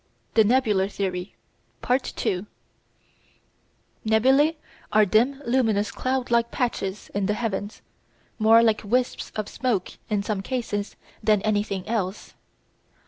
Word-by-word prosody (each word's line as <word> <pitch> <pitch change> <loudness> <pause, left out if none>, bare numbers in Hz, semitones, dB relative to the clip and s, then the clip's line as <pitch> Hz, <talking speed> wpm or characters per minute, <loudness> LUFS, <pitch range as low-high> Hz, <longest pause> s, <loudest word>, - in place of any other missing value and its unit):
THE 220 - +6
NEBULAR 210 -4 +2
THEORY 190 -2 -4 0.5
§ 255 +2 0
2 185 +2 -2 1.6
Nebulæ 265 +8 +4 0.4
are 215 0 +5
dim 250 +8 +2
luminous 225 -5 +1
cloud 255 -1 -2
like 235 0 +3
patches 210 -6 -3
in 200 -1 0
the 210 - +1
heavens, 210 -2 -4 0.6
more 225 +1 +6
like 220 -2 +2
wisps 245 +4 -1
of 215 -1 -3
smoke 230 -8 -1 0.2
in 205 -2 0
some 205 -2 -2
cases 210 -3 -3 0.3
than 215 -2 +2
anything 205 -3 -1
else. 210 -3 -3
215 Hz, 120 wpm, -25 LUFS, 200-240 Hz, 1.6 s, THE